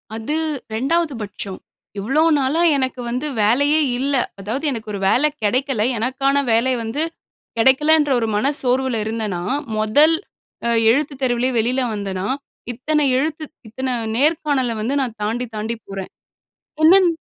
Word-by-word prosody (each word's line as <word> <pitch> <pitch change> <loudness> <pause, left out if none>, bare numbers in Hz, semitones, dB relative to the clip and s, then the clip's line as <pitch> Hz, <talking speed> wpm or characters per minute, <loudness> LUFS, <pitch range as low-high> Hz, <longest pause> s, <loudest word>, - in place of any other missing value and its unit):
அது 225 +7 -3 0.4
ரெண்டாவது 300 +6 0
பட்சம். 200 -2 -7 0.4
இவ்வளோ 270 +10 +1 0.2
நாளா 280 +5 +1 0.2
எனக்கு 260 -1 -2
வந்து 250 +5 -2 0.2
வேலையே 285 +8 +3 0.2
இல்ல. 280 +1 0 0.2
அதாவது 225 +10 -3
எனக்கு 220 -4 -5
ஒரு 200 - -3
வேலை 280 +8 +4 0.2
கெடைக்கல, 255 +1 0 0.2
எனக்கான 270 +4 +1
வேலை 235 +3 +3
வந்து 225 +7 -3 0.6
கெடைக்கலன்ற 295 +5 +4
ஒரு 225 - 0
மன 265 +7 +2
சோர்வில 255 -1 +1
இருந்தனா, 215 -5 -3 0.4
மொதல் 290 +10 +4 0.8
எழுத்துத் 275 +2 0
தேர்விலயே 250 0 +1
வெளியில 245 +4 +1
வந்தேனா, 195 -2 -3 0.5
இத்தன 300 +5 0
எழுத்து, 310 +3 -1 0.2
இத்தன 255 +3 -3 0.2
நேர்காணல 290 -3 +1
வந்து 240 +6 -1
நான் 240 -4 -4
தாண்டி 225 +4 -1
தாண்டி 220 +2 -3
போறேன். 195 -1 -6 0.7
என்னன் 365 +3 +7
255 Hz, 130 wpm, -20 LUFS, 225-285 Hz, 0.8 s, என்னன்